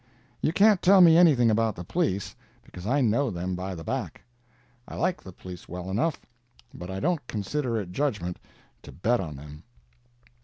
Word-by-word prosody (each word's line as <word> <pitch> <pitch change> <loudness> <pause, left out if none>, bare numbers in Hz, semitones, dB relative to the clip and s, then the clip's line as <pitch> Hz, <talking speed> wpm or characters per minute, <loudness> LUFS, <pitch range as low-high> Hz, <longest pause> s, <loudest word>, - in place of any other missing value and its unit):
You - - +1
can't 205 +1 +4
tell 195 +2 +6
me 170 -3 +8
anything 145 -10 +5
about 110 -1 +1
the 90 - -7
police, 100 - -2 0.3
because 90 +2 -10
I 140 +4 +2
know 120 +3 +2
them 90 -1 -4
by 90 +1 -4
the 80 - -8
back. - - -4 0.6
I - - -9
like 180 +2 -1
the 95 - -11
police 90 -1 -11
well 90 +2 -6
enough, 140 +11 0 0.5
but 90 - -9
I 95 0 -4
don't 160 - -1
consider 115 +3 -2
it 95 -4 -6
judgment 100 -9 -2 0.4
to - - -12
bet 120 +7 0
on 80 -6 -5
them. 75 +2 -11
110 Hz, 180 wpm, -26 LUFS, 90-150 Hz, 0.6 s, me